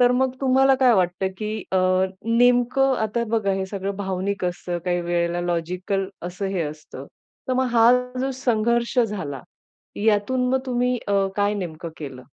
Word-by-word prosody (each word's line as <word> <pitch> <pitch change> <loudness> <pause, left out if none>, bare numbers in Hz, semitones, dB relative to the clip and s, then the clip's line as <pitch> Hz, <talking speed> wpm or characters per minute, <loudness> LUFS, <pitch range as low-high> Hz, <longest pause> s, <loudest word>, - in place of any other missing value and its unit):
तर 245 0 +6
मग 260 +1 +1
तुम्हाला 270 0 +4
काय 250 -2 +6
वाटतं, 185 0 +1
की 215 -1 -3
अ, - - +3 0.6
नेमकं 245 +2 +4
आता 225 +2 -1
बघा 215 -4 +1
हे 190 0 -2
सगळं 195 0 -4
भावनिक 195 0 -2
असतं 175 0 -3
काही 175 -1 0
वेळेला 175 0 -1
लॉजिकल 180 +3 -2 0.2
असंही 190 +1 -3
असतं, 150 -2 -8 0.4
तर - - +1
मग 260 +1 +2
हा 230 0 +6 0.3
जो 270 +1 0
संघर्ष 235 +1 +1
झाला, 200 - -1 0.6
यातून 225 +4 +2
मग 265 - +3
तुम्ही 250 0 0
अ, 200 -1 +2
काय 205 +1 +1
नेमकं 170 -4 -5
केलं? 135 -4 -8
200 Hz, 155 wpm, -23 LUFS, 180-245 Hz, 0.6 s, तर